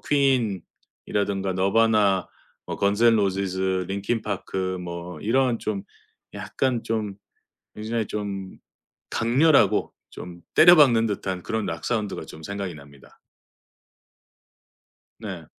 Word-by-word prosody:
퀸이라든가 105 - -1
너바나, 100 -1 +2 0.4
뭐 - - -4
건즈 100 +3 +1
앤 115 -1 +6
로지스, 95 -2 0
린킨 100 +4 -2
파크, 95 -2 -3
그 - - -7
뭐 85 0 -7
이런 120 +2 +1
좀 100 -3 -3 0.5
약간 125 -3 -2
좀 110 -3 -2 0.6
굉장히 110 0 -3
좀 100 -2 -5 0.5
강렬하고 115 - +3 0.2
좀 85 -1 -10
때려박는 145 -10 +7
듯한 95 -3 -3
그런 110 -1 -2
락 80 0 -5
사운드가 105 -8 -2
좀 80 - -12
생각이 100 -3 -5
납니다. 70 -1 -17 2.0
네. - - -7
100 Hz, 220 characters per minute, -24 LUFS, 95-115 Hz, 2.0 s, 때려박는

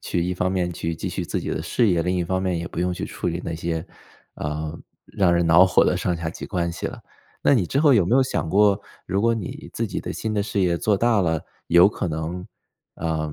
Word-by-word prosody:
去 85 - -1
一 90 0 -1
方 90 +1 0
面 90 -2 -1
去 80 0 -3
继 - - -4
续 - - -3
自 - - -2
己 - - -5
的 - - -2
事 115 - +2
业， 85 -3 +2
另 90 +1 0
一 90 - 0
方 95 +2 -1
面 90 -3 0
也 85 - -4
不 85 - -5
用 90 0 0
去 90 - -4
处 - - -4
理 85 +1 -3
那 85 - -3
些， 80 +1 -3 0.5
呃， 75 +1 -4 0.3
让 95 -3 +2
人 85 -1 +2
恼 85 +3 +7
火 95 - +4
的 - - +2
上 90 -1 -1
下 80 -1 -3
级 85 - -7
关 85 -3 -1
系 - - -4
了。 - - -7 0.4
那 140 - +5
你 95 -8 +2
之 135 - -1
后 145 -4 +5
有 100 -6 +4
没 120 +9 +3
有 135 - +5
想 130 -10 -2
过， 100 +1 +4 0.3
如 95 +2 0
果 115 +1 +3
你 105 -6 -6
自 - - -2
己 - - -4
的 - - -5
新 110 -1 -3
的 100 - +1
事 105 -1 -2
业 90 -2 +2
做 105 +3 +1
大 115 -1 +3
了， 80 -3 +1 0.3
有 85 +3 +7
可 95 -3 -3
能， 80 +3 -4 0.5
啊， 80 -2 -2
90 Hz, 280 characters per minute, -23 LUFS, 85-100 Hz, 0.5 s, 恼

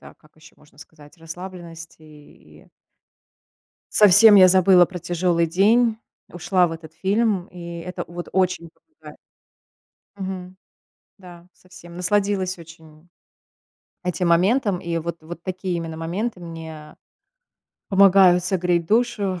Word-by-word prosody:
да, - - -15
как 155 -1 -27
ещё 155 0 -19
можно 150 -2 -25
сказать, 150 0 -17
расслабленности, 165 -1 -11
и 150 -1 -19 1.3
совсем 210 +1 +7
я 185 -2 +8
забыла 185 -1 +5
про 180 0 -9
тяжёлый 170 0 0
день, 220 +6 +2 0.4
ушла 175 +1 +1
в - - -7
этот 160 -1 -11
фильм, 195 +1 -1
и 170 -1 -9
это 180 +1 -7
вот 175 +1 -9
очень 180 -3 -1
помогает. 325 - -18 1.0
Мгм. 185 -1 -7 0.6
Да, 175 -3 -15
совсем 180 -1 -16
насладилась 190 0 -1
очень 160 0 -16 1.0
этим 180 0 -2
моментом, 195 +4 +2
и 170 -1 -4
вот 165 0 -5
вот 170 +1 -10
такие 185 -1 -4
именно 165 -1 -6
моменты 180 +6 -4
мне 160 -2 -10 0.9
помогают 190 -2 +5
согреть 180 -2 0
душу, 210 -4 0
180 Hz, 120 wpm, -21 LUFS, 165-190 Hz, 1.3 s, я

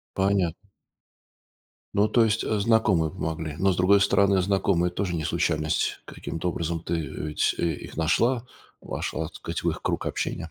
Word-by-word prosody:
Понятно. 95 -4 +2 1.4
Ну, 105 +2 +3
то 115 0 +4
есть, 110 0 +1
э, 110 - 0
знакомые 100 -7 +3
помогли. 80 -1 -4
Но, 95 +1 +3
с - - -3
другой 100 +3 +5
стороны, 100 -1 +3
знакомые 95 -2 +1
тоже 90 0 -2
не 80 -2 -2
случайность. 75 +1 0
Каким-то 85 +2 -4
образом 85 0 -2
ты, 85 +1 -3
э, 75 -2 -4
ведь, 75 - +1
э, - - 0
их 70 - -9
нашла, 115 +10 +2 0.4
вошла, 80 +1 -3
так - - -13
сказать, - - -5
в - - +2
их - - -6
круг - - -2
общения. 80 - -3
90 Hz, 170 wpm, -26 LUFS, 80-100 Hz, 1.4 s, другой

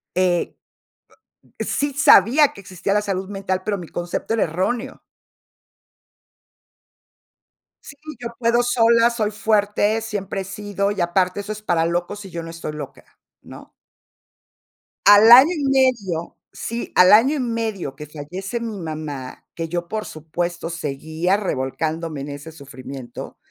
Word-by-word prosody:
eh 180 -1 +1 1.0
sí 285 0 -1
sabía 270 +2 +5
que 200 - -12
existía 185 +2 -3
la 210 - +2
salud 190 -2 -3
mental, 195 -2 -2
pero 210 -1 0
mi 175 -4 -9
concepto 175 +5 -4
era 225 - +2
erróneo. 225 - -3 2.8
Sí, 280 - -11 0.2
yo 240 - -4
puedo 235 0 +2
sola, 235 -1 +4
soy 220 -3 -1
fuerte, 210 0 +1
siempre 205 -3 -4
he - - -4
sido, 200 0 -3
y 205 - -5
aparte 180 +2 +1
eso 205 +1 -5
es 215 - -10
para 170 -5 +1
locos 175 +4 -3
y 195 - -9
yo 170 -1 -5
no 165 - -8
estoy 165 -2 -6
loca, 145 -3 -8 0.4
¿no? - - -13 1.3
Al 205 +3 +8
año 265 +8 +9
y 295 - -3
medio 250 -11 +1
sí, 235 +1 -5
al 180 +2 +7
año 255 +8 +6
y - - -2
medio 225 - -3
que 150 +2 -8
fallece 180 +10 -6
mi 225 -3 -5
mamá, 155 -5 -6
que 165 -1 -4
yo, 175 +1 -3
por 215 +1 -4
supuesto, 170 +2 -4
seguía 160 +4 -1
revolcándome 160 -2 -3
en 145 - -6
ese 145 +3 -8
sufrimiento, 135 -4 -9
195 Hz, 145 wpm, -21 LUFS, 165-220 Hz, 2.8 s, año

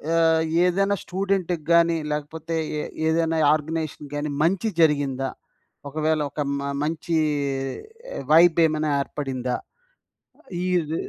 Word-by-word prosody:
ఆహ్, 160 -1 +4 0.2
ఏదైనా 195 +2 +2
స్టూడెంట్‌కి 185 -4 -1
గాని 170 0 +4
లేకపోతే 160 +2 -3 0.2
ఎ - - -4 0.2
ఏదైనా 160 0 +1
ఆర్గనైజేషన్ 155 -1 -3
గాని 145 0 -2
మంచి 190 +6 +1
జరిగిందా? 140 -4 +2 0.6
ఒకవేళ 155 +1 0
ఒక 150 - -3 0.2
మ 140 0 -3
మంచి 165 +2 -1 1.2
వైబ్ 165 +1 +6
ఏమైనా 155 -1 -1
ఏర్పడిందా? 130 -4 -3 1.1
ఈద్ 170 -4 0
160 Hz, 105 wpm, -24 LUFS, 150-170 Hz, 1.2 s, వైబ్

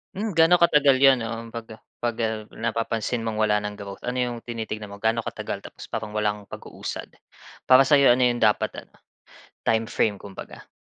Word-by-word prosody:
Hmm, 215 +3 -2
gaano 165 +2 +5
katagal 145 -5 +5
yun, 135 -2 +6
um, 115 0 -6
pag, 115 0 -7
ah, 110 - -15 0.2
pag, 120 -1 -2
ah, 110 -1 -2
napapansin 115 0 -2
mong 110 - -2
wala 105 -1 +3
ng 105 - -4
growth? 100 -1 -9
Ano 125 +1 -1
yung 120 -1 -2
tinitignan 110 -2 -5
mo, 100 - -12
gaano 115 +1 +1
katagal - - -5
tapos - - -11
parang 110 -2 -5
walang 105 -1 -1
pag-uusad, - - -7 0.6
para 130 +1 +7
sa'yo 140 -2 +6
ano 125 - 0
yung 120 -1 +3
dapat, 110 -3 +1
ah, - - -9 0.8
timeframe 110 -2 0
kumbaga? 100 -1 -10
115 Hz, 180 wpm, -24 LUFS, 110-125 Hz, 0.8 s, para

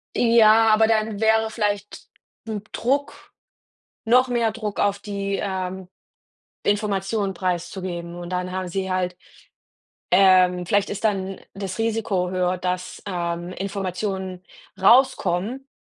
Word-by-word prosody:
Ja, 225 -1 +5
aber 220 +1 +5
dann 215 -1 0
wäre 220 0 +3
vielleicht 205 -2 -3 0.4
'n 215 -2 -4
Druck 280 +4 -2 0.7
noch 250 +3 +4
mehr 235 -3 +1
Druck 215 -2 -5
auf 200 0 +1
die, 200 -1 -3
ähm, 190 -1 -4 0.7
Information 205 -1 0
preiszugeben. 180 -1 -3
Und 175 0 -7
dann 180 0 -2
haben 185 0 -3
sie 190 +1 -3
halt, 180 -1 -1 1.0
ähm 180 -1 +5
vielleicht 200 +3 +1
ist 205 +1 -5
dann 195 -3 -1
das 195 -2 -5
Risiko 220 -5 0
höher, 180 0 0
dass, 180 0 -4
ähm, 175 -2 -3
Informationen 190 -1 -4 0.4
rauskommen, 235 +1 +3
195 Hz, 120 wpm, -23 LUFS, 185-220 Hz, 1.0 s, Ja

